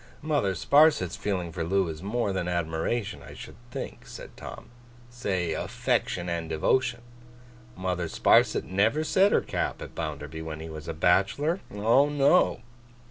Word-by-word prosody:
'Mother 145 -12 +1
Sparsit's 140 - +4
feeling 90 -5 -2
for 85 0 -3
Loo 95 +2 +1
is 80 -1 -6
more 105 +1 -1
than 90 -2 -2
admiration, 85 +6 -2
I - - -11
should - - -10
think,' 135 +2 -7
said - - -10
Tom. - - -10 0.4
'Say 95 -9 -2
affection 90 +2 -1
and 85 -1 -3
devotion. 120 +9 +1 0.8
Mother 90 -2 -2
Sparsit - - +3
never 110 +11 +1
set 190 +6 +3
her - - +3
cap - - -3
at - - -9
Bounderby 75 0 -5
when 80 -1 -6
he 80 +1 -7
was 80 -1 -8
a 80 - -4
bachelor. 105 - +2
Oh 115 +8 +3
no! 145 0 +3
95 Hz, 150 wpm, -27 LUFS, 80-120 Hz, 0.8 s, Sparsit's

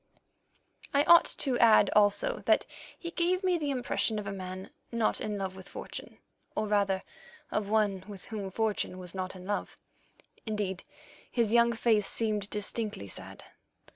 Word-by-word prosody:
I 285 - +5
ought 340 +2 +8
to 260 -4 0
add 220 -3 +6
also 210 - +3
that - - +4 0.3
he 340 - -6
gave 360 +3 +1
me 365 -2 +2
the 295 -2 -1
impression 245 -4 0
of 210 - -4
a 200 - -3
man 185 0 -7 0.2
not 230 -2 0
in 210 -1 -2
love 190 -1 -3
with 190 0 -11
fortune, - - -7 0.4
or - - 0
rather 200 -2 +1 0.5
of 205 -1 -1
one 205 -3 +2
with 200 -3 -9
whom 210 -5 -5
fortune 210 -2 -1
was 180 -2 -6
not 185 0 -4
in 185 0 -10
love; 205 +1 -3 0.7
indeed, 205 -4 -3 0.5
his 230 -3 +1
young 235 0 +5
face 225 -3 +2
seemed 210 -3 -1
distinctly 210 - -2
sad. - - -8
210 Hz, 160 wpm, -30 LUFS, 195-235 Hz, 0.7 s, ought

